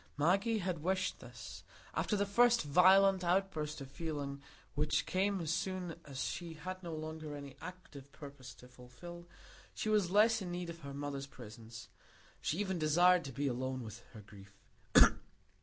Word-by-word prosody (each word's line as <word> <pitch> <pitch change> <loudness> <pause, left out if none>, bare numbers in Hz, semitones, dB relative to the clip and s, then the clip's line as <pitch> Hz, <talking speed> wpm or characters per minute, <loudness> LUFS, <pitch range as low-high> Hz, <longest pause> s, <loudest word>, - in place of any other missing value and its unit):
Maggie 195 +9 +3
had 180 -5 -2
wished 185 +3 0
this; - - -10 0.3
after 210 - 0
the 200 0 +1
first 235 +3 +4
violent 190 +5 +6
outburst 170 -5 0
of 135 0 -8
feeling 145 -3 -4 0.3
which 150 +1 +1
came 195 +1 +1
as 165 -2 -1
soon 185 -2 -2
as 135 -3 -4
she 170 -1 -4
had 185 +3 -6
no 170 -2 -6
longer 155 -1 -5
any 140 -2 -8
active 160 -6 -10
purpose 140 -4 -10
to 125 - -15
fulfil, 130 +8 -11 0.5
she 215 - -2
was 210 -5 +3
less 220 +3 +4
in 185 - -4
need 175 -1 -4
of 170 - -11
her 140 -3 -8
mother's 140 -1 -4
presence; 115 -3 -11 0.5
she 160 - -1
even 190 -3 -1
desired 175 +3 +5
to 135 - -6
be 140 +3 -2
alone 130 0 -2
with 110 0 -8
her 110 - -9
grief. 100 -1 -15
160 Hz, 165 wpm, -35 LUFS, 140-185 Hz, 0.5 s, violent